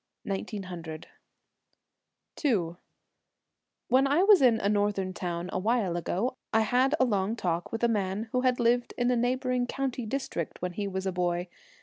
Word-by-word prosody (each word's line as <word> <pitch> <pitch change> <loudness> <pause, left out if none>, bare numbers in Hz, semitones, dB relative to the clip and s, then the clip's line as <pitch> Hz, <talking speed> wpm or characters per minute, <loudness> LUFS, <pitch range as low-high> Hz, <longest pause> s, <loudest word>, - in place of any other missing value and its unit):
1900. 185 -5 -5 1.4
11 180 - +1 1.1
When 265 +2 +4
I 295 +7 +3
was 405 -4 +7
in 240 -4 +5
a - - 0
northern 205 -2 0
town 175 -1 -3
awhile 200 -2 +1
ago 195 +9 -1
I 225 - +4
had 255 +6 +3
a 255 - +5
long 205 -2 0
talk 175 -5 -2
with 225 +1 -4
a - - +6
man 205 -1 -1
who 250 - +1
had 255 -1 +2
lived 240 +1 +2
in 245 0 +2
a - - +3
neighbouring 250 +1 0
country 255 -3 -3
district 220 - -3
when 180 0 -3
he 200 +2 -3
was 190 0 -3
a 190 - 0
boy. 175 0 -1
215 Hz, 160 wpm, -28 LUFS, 185-250 Hz, 1.4 s, was